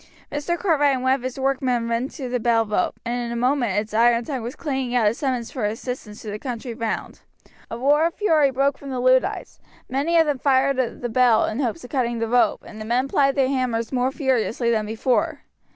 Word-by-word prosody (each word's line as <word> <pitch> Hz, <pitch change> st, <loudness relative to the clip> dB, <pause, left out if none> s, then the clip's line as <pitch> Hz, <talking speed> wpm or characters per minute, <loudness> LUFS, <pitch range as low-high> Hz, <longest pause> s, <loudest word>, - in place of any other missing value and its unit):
Mr. 290 Hz, +4 st, -2 dB
Cartwright 295 Hz, -7 st, +2 dB
and 255 Hz, -, -4 dB
one 260 Hz, 0 st, +4 dB
of 270 Hz, -, -1 dB
his 255 Hz, +1 st, -5 dB
workmen 260 Hz, -3 st, 0 dB
ran 235 Hz, +2 st, -1 dB
to 270 Hz, -2 st, -7 dB
the 250 Hz, 0 st, -1 dB
bell 230 Hz, -1 st, +2 dB
rope, 210 Hz, -3 st, -1 dB
and 240 Hz, +1 st, -2 dB
in 235 Hz, -, -4 dB
a -, -, -3 dB
moment 245 Hz, -4 st, +1 dB
its 210 Hz, +1 st, -2 dB
iron 235 Hz, +1 st, +3 dB
tongue 265 Hz, -2 st, -3 dB
was 235 Hz, +3 st, -6 dB
clanging 265 Hz, -5 st, -3 dB
out 240 Hz, -3 st, +3 dB
its 225 Hz, +5 st, 0 dB
summons 255 Hz, -5 st, -2 dB
for 255 Hz, -, -4 dB
assistance 215 Hz, 0 st, -5 dB
to 215 Hz, -, -5 dB
the 210 Hz, -, -5 dB
country 245 Hz, -1 st, -5 dB
round. 225 Hz, -1 st, -4 dB, 0.5 s
A 230 Hz, -, -5 dB
roar 290 Hz, +6 st, +3 dB
of 340 Hz, -, -7 dB
fury 320 Hz, -9 st, +3 dB
broke 275 Hz, +1 st, 0 dB
from 280 Hz, -, -9 dB
the 260 Hz, -2 st, -3 dB
Luddites; 255 Hz, +1 st, +1 dB, 0.3 s
many 285 Hz, +6 st, +1 dB
of 325 Hz, -, +5 dB
them 290 Hz, -3 st, -1 dB
fired 270 Hz, 0 st, +2 dB
at 250 Hz, -3 st, -2 dB
the -, -, 0 dB
bell 240 Hz, -1 st, +4 dB
in 215 Hz, -, -3 dB
hopes 270 Hz, +4 st, -2 dB
of 245 Hz, -, -11 dB
cutting 240 Hz, -4 st, 0 dB
the 230 Hz, 0 st, -1 dB
rope, 245 Hz, +2 st, +2 dB
and 215 Hz, 0 st, -10 dB
the -, -, -4 dB
men 245 Hz, +4 st, 0 dB
plied 275 Hz, 0 st, +2 dB
their 270 Hz, -2 st, +3 dB
hammers 245 Hz, -4 st, -1 dB
more 255 Hz, 0 st, +1 dB
furiously 255 Hz, -4 st, 0 dB
than 215 Hz, -2 st, 0 dB
before. 225 Hz, +3 st, 0 dB
250 Hz, 230 wpm, -23 LUFS, 230-275 Hz, 0.5 s, of